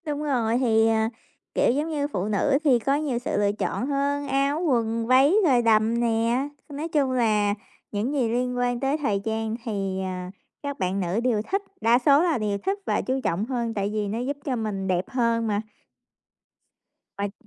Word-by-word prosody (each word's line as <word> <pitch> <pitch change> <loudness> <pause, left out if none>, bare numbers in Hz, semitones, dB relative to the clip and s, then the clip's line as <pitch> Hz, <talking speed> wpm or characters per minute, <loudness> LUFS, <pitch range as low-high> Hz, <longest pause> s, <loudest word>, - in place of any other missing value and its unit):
Đúng 295 -1 -3
rồi, 240 -5 +1
thì, 225 -3 +3
ờ, 225 - +3 0.6
kiểu, - - +3
giống 295 +5 -1
như 290 -2 -1
phụ 195 -10 -3
nữ 215 +7 +2
thì 265 -6 +4
có 275 +5 +1
nhiều 285 -5 -1
sự 245 - -2
lựa 205 0 +2
chọn 210 +3 -2
hơn, 285 0 -1
áo, 275 +2 +1
quần, 230 -3 0
váy 265 +5 +5
rồi 250 -4 +4
đầm 225 0 +3
nè. 235 +3 +1 0.2
Nói 295 +3 -4
chung 290 -5 +1
là 215 -5 +2 0.4
những 220 +7 -1
gì 255 -6 +1
liên 250 +1 -1
quan 245 -1 0
tới 275 +3 0
thời 210 -10 -1
trang 220 0 -2
thì, 195 -5 -2
ờ, 185 -1 -4 0.4
các 285 -1 -4
bạn 185 +1 -1
nữ 185 +3 -1
đều 235 -4 +2
thích, 395 +1 +1 0.2
đa 235 +2 +4
số 280 +3 +5
là 335 -5 +2
đều 210 -3 -1
thích 390 - -2
và - - +1
chú 260 +1 -1
trọng 185 +6 0
hơn 235 -2 -2
tại 200 -1 -1
vì 210 -1 -1
nó 215 +3 -3
giúp 275 +4 -3
cho 265 - 0
mình 210 -4 -3
đẹp 185 0 0
hơn 230 -3 +1
mà. 205 -1 0 1.6
Uầy. 200 0 -2
235 Hz, 200 wpm, -25 LUFS, 215-275 Hz, 1.6 s, váy